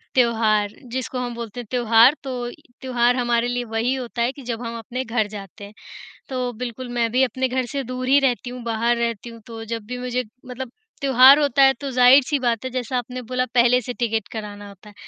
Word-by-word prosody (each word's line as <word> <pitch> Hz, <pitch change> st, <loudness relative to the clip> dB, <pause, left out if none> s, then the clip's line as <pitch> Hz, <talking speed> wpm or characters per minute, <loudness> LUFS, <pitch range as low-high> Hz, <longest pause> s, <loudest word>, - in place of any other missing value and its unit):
त्योहार 220 Hz, -4 st, +2 dB, 0.2 s
जिसको 255 Hz, 0 st, -3 dB
हम 245 Hz, -1 st, -4 dB
बोलते 235 Hz, 0 st, -7 dB
हैं 235 Hz, -, -7 dB
त्योहार, 240 Hz, +2 st, +5 dB
तो 250 Hz, -2 st, -4 dB
य -, -, -10 dB, 0.3 s
त्योहार 245 Hz, -1 st, +2 dB
हमारे 240 Hz, -1 st, +1 dB
लिए 245 Hz, 0 st, -2 dB
वही 225 Hz, +3 st, -1 dB
होता 245 Hz, -2 st, -5 dB
है 240 Hz, +2 st, +2 dB
कि 280 Hz, -, -13 dB
जब 235 Hz, -1 st, -4 dB
हम 230 Hz, -1 st, -5 dB
अपने 245 Hz, +3 st, -5 dB
घर 225 Hz, -2 st, 0 dB
जाते 205 Hz, 0 st, -10 dB
हैं। 205 Hz, -, -13 dB, 0.6 s
तो 255 Hz, -2 st, -2 dB
बिल्कुल 245 Hz, +2 st, -6 dB
मैं 235 Hz, -1 st, +1 dB
भी 250 Hz, +2 st, +2 dB
अपने 260 Hz, +1 st, 0 dB
घर 255 Hz, 0 st, -1 dB
से 275 Hz, +2 st, -4 dB
दूर 255 Hz, +1 st, -5 dB
ही 275 Hz, +2 st, +5 dB
रहती 250 Hz, -2 st, 0 dB
हूँ, 250 Hz, 0 st, -8 dB
बाहर 230 Hz, +1 st, 0 dB
रहती 235 Hz, -1 st, -2 dB
हूँ, 230 Hz, 0 st, -11 dB
तो 225 Hz, -1 st, -8 dB
जब 230 Hz, -1 st, -4 dB
भी 250 Hz, +3 st, -6 dB
मुझे 250 Hz, 0 st, -2 dB, 0.2 s
मतलब 250 Hz, 0 st, -7 dB, 0.3 s
त्योहार 265 Hz, +1 st, +7 dB
होता 280 Hz, -2 st, +3 dB
है 270 Hz, 0 st, +6 dB
तो 280 Hz, -, -3 dB
ज़ाहिर-सी 260 Hz, +3 st, +5 dB
बात 240 Hz, -1 st, -1 dB
है -, -, -2 dB
जैसा 250 Hz, 0 st, -2 dB
आपने 250 Hz, +1 st, -5 dB
बोला 255 Hz, +1 st, -2 dB
पहले 245 Hz, +1 st, +5 dB
से 245 Hz, -, -5 dB
टिकट 225 Hz, -3 st, -2 dB
कराना 205 Hz, -2 st, -7 dB
होता 200 Hz, +1 st, -15 dB
है। -, -, -16 dB
245 Hz, 225 wpm, -22 LUFS, 230-255 Hz, 0.6 s, त्योहार